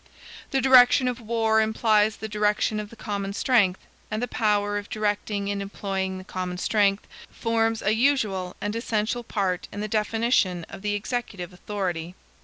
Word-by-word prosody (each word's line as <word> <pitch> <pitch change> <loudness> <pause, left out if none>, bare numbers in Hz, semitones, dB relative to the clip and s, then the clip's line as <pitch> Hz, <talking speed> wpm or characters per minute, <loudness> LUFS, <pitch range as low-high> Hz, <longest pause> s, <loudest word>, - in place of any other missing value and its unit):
The 270 - +1
direction 255 0 +6
of 245 -1 -2
war 225 -1 +2
implies 220 -1 +2
the 220 - -6
direction 210 0 +1
of 210 -1 -6
the 230 - -13
common 200 -3 -4
strength; 205 -5 +2 0.3
and 215 - -2
the 245 - -1
power 205 -3 +1
of 205 - -11
directing 205 -1 -1
and 200 0 -2
employing 195 -1 -3
the 185 - -8
common 185 -2 -4
strength, 200 +1 +1 0.2
forms 225 -1 0
a 210 - +2
usual 215 -8 +1
and 205 +1 -3
essential 230 +1 -1
part 190 -5 -2
in 205 - -7
the 210 - -2
definition 215 -4 +1
of - - -9
the 205 0 -1
executive 205 -5 -4
authority. 180 -3 -4
210 Hz, 165 wpm, -25 LUFS, 195-225 Hz, 0.3 s, direction